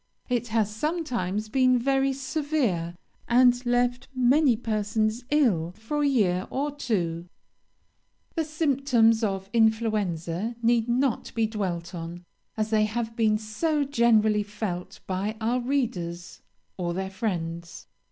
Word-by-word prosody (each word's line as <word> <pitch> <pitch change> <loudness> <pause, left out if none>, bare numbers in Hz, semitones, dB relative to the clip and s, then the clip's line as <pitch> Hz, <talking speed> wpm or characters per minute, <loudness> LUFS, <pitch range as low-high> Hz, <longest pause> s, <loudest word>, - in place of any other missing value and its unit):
It 245 -1 0
has 220 -2 0
sometimes 235 - -2
been 255 +1 +3
very 270 +2 +2
severe, 265 - -1 0.3
and 245 +1 +4
left 245 +1 +1
many 255 0 +4
persons 215 +1 -1
ill 205 - +2
for 260 +7 -3
a 290 - +3
year 195 -9 +1
or 285 +2 -2
two. 175 -11 -2 1.1
"The 325 - 0
symptoms 275 -7 +2
of 195 -2 -1
influenza 215 -3 +1
need 235 0 +2
not 250 0 0
be 225 -1 +2
dwelt 190 -5 -3
on, 170 +1 -7 0.3
as 215 0 -1
they 215 -1 +4
have 225 +1 -3
been 220 -2 +3
so 285 +9 -1
generally 225 -5 +3
felt 205 -4 -5
by 195 +4 -2
our 235 +3 0
readers 180 - -3 0.4
or 175 -2 -2
their 190 0 -3
friends. 170 -4 -4
225 Hz, 125 wpm, -26 LUFS, 190-255 Hz, 1.1 s, and